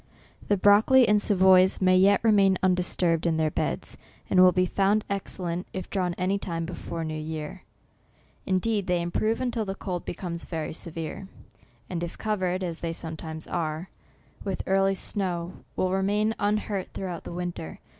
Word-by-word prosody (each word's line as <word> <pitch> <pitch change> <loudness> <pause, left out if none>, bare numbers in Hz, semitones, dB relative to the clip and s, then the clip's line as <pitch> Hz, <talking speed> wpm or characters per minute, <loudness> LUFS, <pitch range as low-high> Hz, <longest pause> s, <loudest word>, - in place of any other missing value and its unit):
The 205 - +2
broccoli 220 +6 +6
and 210 0 +4
Savoys 190 -2 +5
may 185 -1 +4
yet 195 +2 +5
remain 200 -4 +4
undisturbed 180 -2 +2
in 160 -1 +1
their 155 -1 +1
beds, - - -2 0.3
and 185 - +4
will 185 0 +8
be 185 0 +2
found 200 +3 +1
excellent 180 -3 -3
if 185 - -6
drawn 180 -3 -1
any 190 +2 0
time 165 -3 -3
before 170 -1 -5
new 155 -1 -4
year. 155 +3 -5 0.9
Indeed, 200 +2 0
they 180 -1 +2
improve, 215 +6 0
until 245 -3 -1
the 195 -2 -4
cold 180 -3 -4
becomes 170 -1 -5
very 160 -3 -4
severe, 165 +3 -6 0.6
and 175 -2 -4
if 170 - -6
covered, 185 -4 -1
as 170 -2 -4
they 165 -1 -3
some 160 -1 -4
times 160 0 -7
are, 160 +1 -3 0.5
with 195 -2 -3
early 195 0 +2
snow, 180 -3 -2 0.2
will 185 - 0
remain 205 +3 +1
un 205 +1 +2
hurt 200 -3 -4
throughout 180 -3 -5
the - - -8
winter. 175 - -5
185 Hz, 165 wpm, -26 LUFS, 170-200 Hz, 0.9 s, will